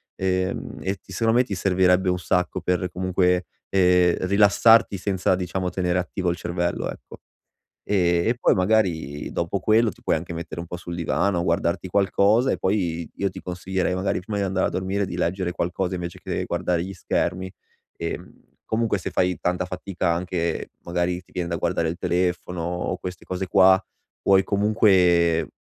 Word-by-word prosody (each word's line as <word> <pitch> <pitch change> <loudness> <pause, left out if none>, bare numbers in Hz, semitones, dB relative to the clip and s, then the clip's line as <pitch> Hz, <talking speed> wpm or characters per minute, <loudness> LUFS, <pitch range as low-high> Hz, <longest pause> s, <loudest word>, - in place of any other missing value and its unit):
ehm, 95 0 -2
e 95 +1 -2
ti 95 - -17
secondo 115 +5 +2
me - - +5
ti 105 -6 -4
servirebbe 90 0 +3
un 90 - +1
sacco 90 +1 0
per 90 0 0
comunque, 90 0 +1 0.2
ehm, 90 -2 +4
rilassarti 105 +2 +5
senza 95 -1 0
diciamo 90 0 -2
tenere 90 -1 0
attivo 90 0 -2
il 85 - -1
cervello, 85 0 -2
ecco. - - -10 0.7
Ehm, 85 -2 +2
e 120 - +1
poi - - +3
magari 90 -8 0
dopo 85 +3 -1
quello, 110 +4 +3
ti - - -17
puoi - - +1
anche 85 +2 -4
mettere 85 0 -6
un 85 - -8
po' 85 - -5
sul 85 0 -7
divano, 85 +2 0
guardarti 85 +1 0
qualcosa 100 +5 +3
e - - 0
poi, 85 -5 -1
io 100 - 0
ti 95 - -9
consiglierei, 90 +1 -2
magari 95 0 -1
prima 105 +3 -4
di 100 - 0
andare 95 -1 0
a - - -4
dormire, 95 +2 -1
di 90 - -5
leggere 90 +1 -1
qualcosa 90 +1 -2
invece 85 -1 -6
che - - -3
guardare 85 -1 -1
gli 95 +1 -7
schermi. 90 +1 -2 0.4
Che, 85 0 -4
mhmm, 90 - -16 0.3
comunque 110 -2 +1
se - - -5
fai 90 -1 +1
tanta 90 +1 -1
fatica 90 -1 -2
anche, 85 0 -2
magari 90 +1 -1
ti - - -27
viene 90 -2 -3
da 85 - -2
guardare 85 -1 0
il 80 - -3
telefono 90 -1 -1
o 90 +2 -2
queste 90 0 -7
cose 95 0 -4
qua, 95 +1 +5 0.4
puoi 95 -1 +4
comunque 95 -5 +3
90 Hz, 180 wpm, -24 LUFS, 85-95 Hz, 0.7 s, me